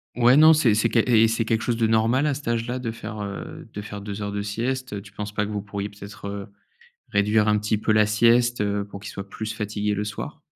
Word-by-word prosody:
Ouais, 125 +2 +5
non, 155 +1 +8
c'est 130 -9 +3
c'est 110 +2 +3
qu 115 - +2
et 115 -1 +5
c'est 115 +1 0
quelque 110 0 0
chose 120 - 0
de 115 -1 +2
normal 115 +5 +2
à 150 - +2
cet 140 0 -7
âge-là 120 +2 -1
de 120 -2 -3
faire, 110 -1 -7
heu, 100 -1 -7
de 105 - -5
faire 105 0 -7
2 100 0 -6
heures 100 0 -3
de 100 - -2
sieste? 120 +4 -3
Heu, 100 - -4
tu 100 0 -15
penses 105 0 -6
pas 105 -1 0
que 105 - -6
vous 105 -1 -2
pourriez, 100 0 -5
peut-être, 100 0 -10
heu, 100 -1 -6 0.6
réduire 105 +1 +3
un 105 0 +3
petit 105 0 0
peu 110 - +1
la 110 0 +5
sieste, 120 +3 +3
heu, 100 0 0
pour 100 0 -9
qu'il 100 +1 -8
soit 100 -1 -7
plus 110 +1 -5
fatigué 105 -1 -2
le 100 - -2
soir? 105 -1 -6
105 Hz, 260 wpm, -24 LUFS, 105-115 Hz, 0.6 s, non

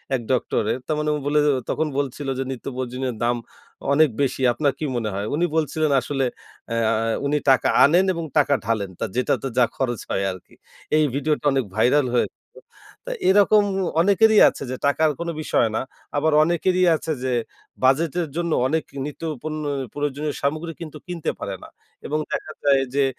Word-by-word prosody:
এক 125 - -2
ডক্টরের। 120 -3 0
তার 155 - 0
মানে 150 0 0
ও - - -1
বলে 150 +1 +3
গেল 145 -2 +3
তখন 160 - 0
বলছিল 140 0 -3
যে - - 0
"নিত্য 130 - -7
প্রয়োজনীয়ের 130 0 -3
দাম 120 +1 +2 0.6
অনেক 155 +1 +5
বেশি। 135 -1 0
আপনার 145 +2 +1
কী 155 - -2
মনে 115 -3 -1
হয়?" 100 +1 -2
উনি 170 +4 +2
বলছিলেন 155 -1 +1
"আসলে 135 +1 -1 0.4
অ্যা 115 -1 +1 0.3
উনি 145 +1 +1
টাকা 130 - +4 0.2
আনেন 175 +6 +5
এবং 170 -1 -4
টাকা 145 -1 +4
ঢালেন। 105 -3 -1
তা - - -1
যেটাতে 125 +2 0
যা 125 - +6
খরচ 120 -4 -1
হয় 95 - 0
আরকি।" 90 -1 -12 0.4
এই 155 - +4
ভিডিওটা 150 +1 -1
অনেক 135 -2 +1
ভাইরাল 130 +5 +3
হয়েছিল। 120 - 0 0.7
তো - - -4 0.2
এরকম 205 +2 +5 0.4
অনেকেরই 210 +3 +5
আছে - - -8
যে, - - -2
টাকার 155 +2 +3
কোনো 170 0 -2
বিষয় 120 -6 +2
না। - - 0 0.4
আবার 155 +2 +2
অনেকেরই 180 +3 +1
আছে 160 - -4
যে 130 -1 0 0.5
বাজেটের 160 +5 +2
জন্য 170 -1 -1 0.2
অনেক 160 +2 0 0.2
নিত্য 150 +2 -8 0.2
পণ্য 155 -1 -4 0.3
প্রয়োজনীয় 145 +1 -2
সামগ্রী 155 +4 -1
কিন্তু 155 -2 -7
কিনতে 175 -3 -2
পারে - - -4
না - - -11 0.4
এবং 155 +1 -1
দেখা 155 - -3
যায় 140 -1 +4
যে 140 - +4
145 Hz, 175 wpm, -23 LUFS, 130-160 Hz, 0.7 s, যা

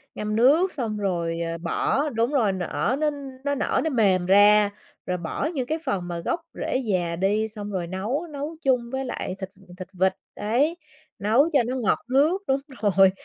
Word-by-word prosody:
ngâm 210 0 -2
nước 305 +11 +4
xong 225 -6 -3
rồi, 170 -4 -1
ờ, 165 0 -3
bỏ 270 - 0
đúng 230 +2 0
rồi 220 -8 +2
nở 190 +7 -1
nó 305 -1 +2 0.3
nó 285 0 0
nở 280 - 0
nó 320 - 0
mềm 195 -8 +2
ra, 205 +2 +6 0.4
rồi 180 0 -1
bỏ 170 - -3
những 255 -4 -2
cái 315 +1 -1
phần 190 -8 -1
mà 170 -1 -4
gốc 330 - -2
rễ - - -2
già 185 -9 -1
đi, 205 +5 +1
xong 210 -1 -7
rồi 180 -3 -2
nấu 220 - -3
nấu 295 +2 -5
chung 250 -4 +1
với 265 0 -2
lại 190 -6 -4
thịt 190 -1 -5 0.3
thịt 185 - -7
vịt, 190 +1 +2 0.2
đấy, 275 +11 +1 0.4
nấu 235 +10 +3
cho 280 - +5
nó 255 - -2
ngọt 240 -6 +1
nước. 305 +9 +3
Đúng 270 +1 +2 0.2
rồi, 195 -2 +5
215 Hz, 195 wpm, -25 LUFS, 190-270 Hz, 0.4 s, ra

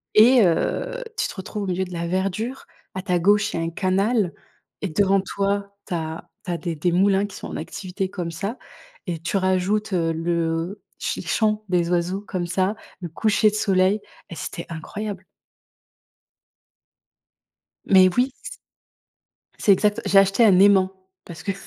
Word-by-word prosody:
et 235 +2 +7
heu, - - 0
tu - - +1
te - - -9
retrouves 205 +2 -5
au - - -4
milieu 185 +1 -1
de 180 - -10
la 170 0 -3
verdure. 195 +8 -2 0.3
À 185 - -3
ta 180 -3 0
gauche, 205 +3 +3
il - - -2
y - - -1
a - - -1
un 165 - -1
canal 195 +2 +1 0.5
et - - +1
devant 195 +4 +3
toi, 200 +1 -2
tu - - -4
as 160 0 -5 0.2
tu 180 - -3
as 170 - -1
des 170 -2 -4
des 170 +4 0
moulins 195 +2 +3
qui 200 - -9
sont - - -7
en - - -7
activité 185 +3 -4
comme 175 -3 -4
ça 200 +9 -4 0.5
et 170 -2 -2
tu 175 +4 -1
rajoutes, 190 +3 0
heu, 165 -2 +1
le 165 +3 -1 0.2
ch - - -2
les - - -13
chants 215 -1 +1
des 175 -2 +1
oiseaux 180 +3 0
comme 180 -2 -2
ça, 190 +4 0 0.3
le 175 - -5
coucher 215 +4 +2
de 210 - -5
soleil 195 -1 +2 0.3
et 170 - -7
c'était 170 - -6
incroyable. 190 +4 -6 2.6
Mais 185 -1 +7
oui. 255 +2 +2 1.3
C'est 205 - +5
exact 210 +3 +2
j'ai 195 - +5
acheté 195 +4 +5
un 195 -4 +6
aimant. 190 -1 +5 0.3
Parce 170 -2 -10
que 200 - 0
190 Hz, 175 wpm, -23 LUFS, 175-205 Hz, 2.6 s, et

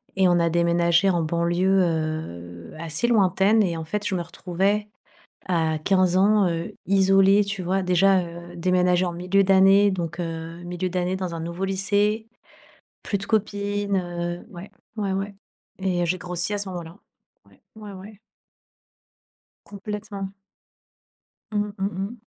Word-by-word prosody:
et 190 -1 +4
on 175 -1 +3
a 170 0 +2
déménagé 170 +2 +3
en 175 -2 +1
banlieue, 175 +4 +1
heu, 155 - -4
assez 165 +7 -1
lointaine 205 -1 +3
et 175 -5 0
en 160 - -4
fait, 205 +6 -3
je 190 - -1
me 175 - -1
retrouvais 190 +4 -1 0.6
à 160 -3 0
15 185 +1 +2
ans, 205 +1 +4
heu, 165 0 -3
isolée, 195 +1 +4
tu 200 -1 -3
vois? 190 +2 0
Déjà, 185 +1 +4
heu, 170 0 -9
déménager 180 +1 +2
en 175 - -2
milieu 180 +3 +1
d'année, 195 +1 +5
donc, 170 -2 -4
heu, 165 0 -6
milieu 175 +1 -3
d'année 180 +1 -1
dans 185 -2 -4
un 165 - -5
nouveau 170 +3 -4
lycée. 205 +3 +1 0.7
Plus 200 - -2
de 195 - -4
copines, 205 -1 -1
heu, 175 -1 -4
ouais, 180 +2 -10 0.3
ouais, 200 -3 -1
ouais 195 +1 -3 0.5
et 180 -2 0
j'ai 185 +2 0
grossi 180 +3 -1
à - - -1
ce 200 -1 -2
moment 180 -2 -5
là. 165 +2 -12 0.5
Ouais, - - -23 0.2
ouais, 210 -2 -10
ouais. 200 +2 -12 1.5
Complètement. 200 -1 -6 1.2
Mmh, 210 -1 -1
mmh 195 - 0 0.2
mh. 220 +5 -7
185 Hz, 155 wpm, -24 LUFS, 170-200 Hz, 1.5 s, d'année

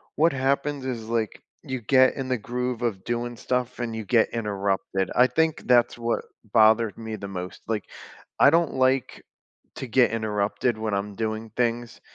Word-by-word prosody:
what 165 +1 +3
happens 140 +1 -1
is, 120 -4 -4
like, 115 -2 -2 0.2
you 130 -2 -4
get 130 +3 +4
in 135 -1 -4
the 130 - +1
groove 125 +2 -3
of 105 -6 -2
doing 120 0 -3
stuff 125 +1 -2
and 115 -2 -3
you 110 -1 -5
get 115 +2 +3
interrupted, 100 -3 -1
I 125 - +6
think 160 +2 0
that's 120 -1 +4
what 115 0 -2 0.3
bothered 110 -1 +4
me 110 -1 -5
the 100 - -7
most, 90 -2 -7
like, 110 -3 -2 0.5
I - - +8
don't 165 0 +2
like 130 0 +1 0.5
to 130 - -6
get 125 0 +3
interrupted 110 +1 -1
when 110 -1 -2
I'm 100 +1 -2
doing 110 +1 -3
things, 120 -1 -1
115 Hz, 175 wpm, -25 LUFS, 110-130 Hz, 0.5 s, I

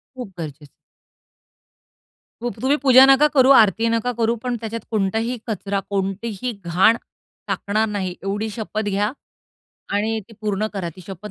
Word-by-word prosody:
खूप 250 -4 -6
गरजेचं 155 -2 -7
आहे. 145 - -13 1.7
खूप, 240 -4 -4
तुम्ही 270 +3 +2
पूजा 260 -1 +8
नका 270 +2 +6
करू, 260 0 +6
आरती 225 +2 +2
नका 230 +2 0
करू, 230 0 +2
पण 250 -1 -2
त्याच्यात 230 0 -4
कोणताही 225 +3 0
कचरा, 200 -2 -2
कोणतीही 200 +4 -2
घाण 180 +7 +4 0.5
टाकणार 215 +2 0
नाही 190 -3 -3
एवढी 205 +3 -2
शपथ 215 0 -4
घ्या 205 +2 0 0.8
आणि 220 +2 0
ती - - -15
पूर्ण 210 -1 -1
करा. 190 -4 -3
ती - - -11
शपथ 195 +2 -8
215 Hz, 150 wpm, -21 LUFS, 195-235 Hz, 1.7 s, पूजा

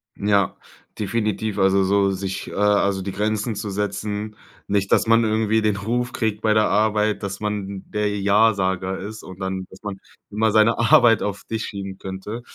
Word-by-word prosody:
Ja, 100 -2 +1 0.4
definitiv. 105 -1 -2
Also 95 0 +4
so 100 0 +2
sich, 95 0 -4
äh, - - -9
also 100 -1 +2
die 95 +1 -4
Grenzen 110 +2 -1
zu 105 - -4
setzen. 105 +1 -3 0.3
Nicht, 100 -1 0
dass - - +3
man 115 +1 +5
irgendwie 110 0 +1
den 105 -1 +1
Ruf 120 +4 -2
kriegt 110 -3 -2
bei 110 -1 +3
der 110 0 +4
Arbeit, 105 0 +1
dass 100 -1 -4
man 100 -2 -4
der 105 -1 -1
Ja-Sager 95 -2 +2
ist 110 +3 -8
und 95 0 -11
dann 95 -1 -3
dass 95 - -15
man 100 -2 -5 0.3
immer 110 +1 +1
seine 110 +2 +4
Arbeit 115 0 +5
auf 100 -1 -4
dich 110 0 -3
schieben 95 -1 -6
könnte. 95 +5 -6
105 Hz, 175 wpm, -22 LUFS, 95-110 Hz, 0.4 s, man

